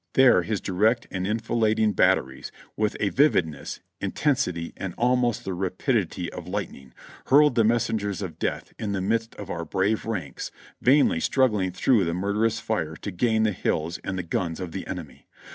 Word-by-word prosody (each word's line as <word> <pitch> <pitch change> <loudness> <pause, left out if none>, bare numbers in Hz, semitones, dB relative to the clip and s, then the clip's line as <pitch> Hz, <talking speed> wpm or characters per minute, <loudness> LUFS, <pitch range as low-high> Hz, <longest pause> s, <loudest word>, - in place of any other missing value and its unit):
There 130 -2 +6
his 110 -3 -2
direct 105 +6 +1
and 95 -1 -2
enfilading 110 -1 +1
bat - - +5
teries, 65 +1 -8 0.3
with 105 -1 0
a 105 - +1
vividness, 90 - +1 0.2
intensity 90 - -1
and 95 -3 -5
almost 120 -1 +1
the 95 - -2
rapidity 95 - -1
of - - -8
light - - -3
ning, 65 -2 -14 0.4
hurled 145 +1 +6
the 115 -2 +3
messengers 105 -3 0
of 90 -4 -7
death - - -3
in 105 -2 -2
the 95 - -1
midst 115 +4 -1
of 100 - -7
our 85 - -3
brave 95 +7 0
ranks 90 -11 -4 0.3
vainly 135 - +4
struggling 105 -5 +2
through 100 +4 +3
the 85 0 -1
murderous 105 +4 0
fire - - -2
to - - -6
gain 110 +4 +1
the 110 - +2
hills 85 -2 -2
and 95 - -3
the 90 - -2
guns 85 -1 -2
of 90 -3 -5
the - - -6
enemy. - - -8
105 Hz, 180 wpm, -25 LUFS, 90-115 Hz, 0.4 s, There